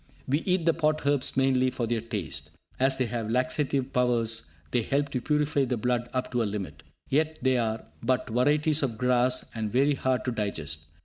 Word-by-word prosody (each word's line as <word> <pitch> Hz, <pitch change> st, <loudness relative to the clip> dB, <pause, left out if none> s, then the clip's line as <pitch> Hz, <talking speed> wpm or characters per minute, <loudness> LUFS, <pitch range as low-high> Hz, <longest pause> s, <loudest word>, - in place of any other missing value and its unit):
We 140 Hz, +3 st, +2 dB
eat 180 Hz, -3 st, +2 dB
the 165 Hz, -, +4 dB
pot 155 Hz, -2 st, 0 dB
herbs 140 Hz, -3 st, +1 dB
mainly 130 Hz, -1 st, +3 dB
for 125 Hz, -2 st, -2 dB
their 115 Hz, 0 st, -1 dB
taste. 105 Hz, -, -5 dB, 0.3 s
As 135 Hz, +1 st, +3 dB
they 130 Hz, -, +1 dB
have 115 Hz, -2 st, -3 dB
laxative 130 Hz, +2 st, 0 dB
powers, 115 Hz, -5 st, +2 dB, 0.2 s
they 120 Hz, -, +2 dB
help 140 Hz, +5 st, 0 dB
to 125 Hz, -3 st, -2 dB
purify 150 Hz, 0 st, +1 dB
the 125 Hz, -1 st, -1 dB
blood 120 Hz, +1 st, -1 dB
up 130 Hz, 0 st, -2 dB
to 120 Hz, -1 st, +1 dB
a -, -, +1 dB
limit. 100 Hz, -8 st, -5 dB, 0.3 s
Yet 155 Hz, +3 st, +1 dB
they 130 Hz, -1 st, +3 dB
are 110 Hz, -1 st, -2 dB, 0.2 s
but 130 Hz, +2 st, 0 dB
varieties 150 Hz, +5 st, +2 dB
of 120 Hz, -6 st, -1 dB
grass, 125 Hz, +1 st, +2 dB
and 110 Hz, -2 st, -3 dB
very 140 Hz, +5 st, +3 dB
hard 130 Hz, -1 st, 0 dB
to 125 Hz, -, 0 dB
digest. 80 Hz, -9 st, -3 dB
125 Hz, 195 wpm, -27 LUFS, 115-140 Hz, 0.3 s, the